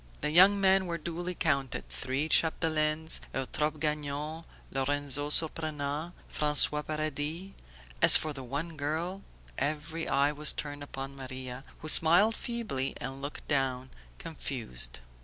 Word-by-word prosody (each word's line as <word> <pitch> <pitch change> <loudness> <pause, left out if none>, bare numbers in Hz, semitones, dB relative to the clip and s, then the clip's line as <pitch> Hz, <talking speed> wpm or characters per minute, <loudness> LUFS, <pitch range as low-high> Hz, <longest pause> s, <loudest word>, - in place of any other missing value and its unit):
The 150 - -1
young 190 +5 +6
men 190 -1 +3
were 170 -1 -3
duly 175 +2 -5
counted: 140 -7 -1
three 135 +4 -3
Chapdelaines, 160 -1 +1 0.2
Eutrope 150 +3 -2
Gagnon, 150 +1 -3 0.3
Lorenzo 145 +1 -1
Surprenant, 155 0 -1
François 150 0 +3
Paradis. 155 +4 -3 0.5
As - - +10
for 155 -1 -4
the 135 -2 -8
one 145 +6 -5
girl... 160 +7 -3 0.4
Every 155 +2 -3
eye 140 +1 +2
was 150 0 +1
turned 145 -1 -6
upon 135 -1 -7
Maria, 130 -1 -8 0.2
who 155 - -7
smiled 175 +8 +7
feebly 215 - -4
and 135 +2 -6
looked 145 +1 -7
down, 130 -2 -2 0.3
confused. 110 - -2
150 Hz, 125 wpm, -29 LUFS, 140-160 Hz, 0.5 s, As